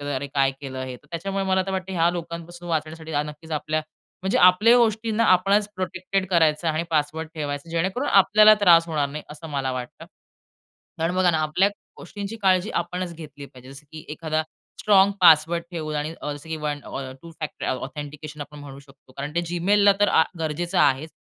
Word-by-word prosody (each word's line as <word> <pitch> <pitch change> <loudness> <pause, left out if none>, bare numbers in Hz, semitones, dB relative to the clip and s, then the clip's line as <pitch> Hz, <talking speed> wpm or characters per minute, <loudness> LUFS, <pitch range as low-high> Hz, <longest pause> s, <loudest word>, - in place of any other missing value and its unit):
अरे, 135 +2 -4
काय 135 -1 +1
केलं 130 -2 -6
हे. 130 -1 -6
तर 150 - -27
त्याच्यामुळे 195 +4 -3
मला 190 0 +2
तर - - -2
वाटतं 190 0 -4
ह्या 170 -1 +3
लोकांपासून 170 0 -7
वाचण्यासाठी 160 0 -3
आ, 145 0 +1
नक्कीच 150 +2 -10
आपल्या, 155 +1 -1 0.4
म्हणजे 190 - +1
आपल्या 205 +7 +6
गोष्टींना 225 -1 +1
आपणच 200 +3 +2
प्रोटेक्टेड 185 +1 -2
करायचं 160 -2 +2
आणि 160 +1 0
पासवर्ड 155 +1 -1
ठेवायचं, 145 0 -4
जेणेकरून 190 +11 -1
आपल्याला 215 +2 +6
त्रास 170 -3 +6
होणार 150 -3 0
नाही 150 +2 -7
असं 155 +2 -10
मला 135 -2 -2
वाटतं. 125 -1 -7 0.9
कारण 165 +2 -1
बघा 185 -1 +3
ना 160 - +1
आपल्या 155 +6 +2 0.3
गोष्टींची 205 +1 -7
काळजी 190 +1 +2
आपणच 180 0 -4
घेतली 145 -3 -10
पाहिजे. 130 -1 -15
जसं 140 +2 -13
की 155 -1 -9
एखादा 155 0 -2 0.4
स्ट्राँग 200 -1 +5
पासवर्ड 165 0 +5
ठेवून 155 -3 -4
आणि 150 +2 -3
अ, 150 - -3
जसं 145 +2 -11
की 160 - -2
अ, - - -8
वन 150 -1 -2 0.4
टू 170 - -11
फॅक्टर 155 -2 -5
ऑ - - 0
ऑथेंटिकेशन 150 +1 -8
आपण 150 +1 -9
म्हणू 140 -1 -10
शकतो. 135 -2 -21
कारण 140 +4 -7
ते 170 - +2
Gmailला 200 +4 +4
तर 205 - +4
आ, 160 - +4 0.2
गरजेचं 170 +3 -2
आहेच. 140 +4 +2
165 Hz, 190 wpm, -23 LUFS, 150-185 Hz, 0.9 s, आपल्या